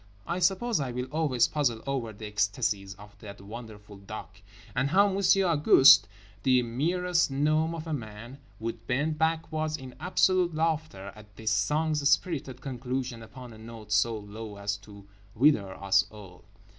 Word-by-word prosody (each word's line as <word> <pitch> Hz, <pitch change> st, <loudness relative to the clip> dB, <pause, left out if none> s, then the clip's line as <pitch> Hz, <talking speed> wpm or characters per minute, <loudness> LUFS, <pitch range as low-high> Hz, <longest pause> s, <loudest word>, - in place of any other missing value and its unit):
_" -, -, -27 dB, 0.2 s
I 175 Hz, +2 st, -2 dB
suppose 195 Hz, +5 st, +1 dB
I 135 Hz, -3 st, -2 dB
will 125 Hz, +1 st, -3 dB
always 145 Hz, -6 st, +2 dB
puzzle 125 Hz, -7 st, -1 dB
over 130 Hz, -5 st, -2 dB
the 110 Hz, +1 st, -10 dB
ecstasies 105 Hz, -1 st, -1 dB
of 105 Hz, +1 st, -15 dB
That 100 Hz, -2 st, -10 dB
Wonderful 105 Hz, 0 st, -10 dB
Duck. 100 Hz, 0 st, -10 dB, 0.3 s
And 135 Hz, +2 st, +1 dB
how 200 Hz, +6 st, +5 dB
Monsieur 195 Hz, 0 st, +3 dB
Auguste, 145 Hz, -4 st, +7 dB, 0.3 s
the 130 Hz, 0 st, +3 dB
merest 170 Hz, +9 st, 0 dB
gnome 155 Hz, +4 st, +1 dB
of 160 Hz, -1 st, -7 dB
a 160 Hz, -, -4 dB
man, 120 Hz, +1 st, -7 dB, 0.2 s
would 115 Hz, +1 st, -6 dB
bend 150 Hz, +4 st, -1 dB
backwards 160 Hz, -1 st, -1 dB
in 130 Hz, -2 st, -10 dB
absolute 180 Hz, 0 st, +2 dB
laughter 155 Hz, -12 st, -2 dB
at 105 Hz, -1 st, -16 dB
this 110 Hz, 0 st, -2 dB
song's 150 Hz, +7 st, +1 dB
spirited 140 Hz, -8 st, 0 dB
conclusion 125 Hz, -2 st, -4 dB
upon 120 Hz, +1 st, -11 dB
a 110 Hz, -, -13 dB
note 110 Hz, -1 st, -11 dB
so 110 Hz, +2 st, +2 dB
low 105 Hz, 0 st, -9 dB
as 100 Hz, 0 st, -2 dB
to 100 Hz, -1 st, -15 dB, 0.3 s
wither 110 Hz, -7 st, +3 dB
us 100 Hz, 0 st, +3 dB
all. 100 Hz, -4 st, -14 dB
125 Hz, 160 wpm, -28 LUFS, 105-155 Hz, 0.3 s, Auguste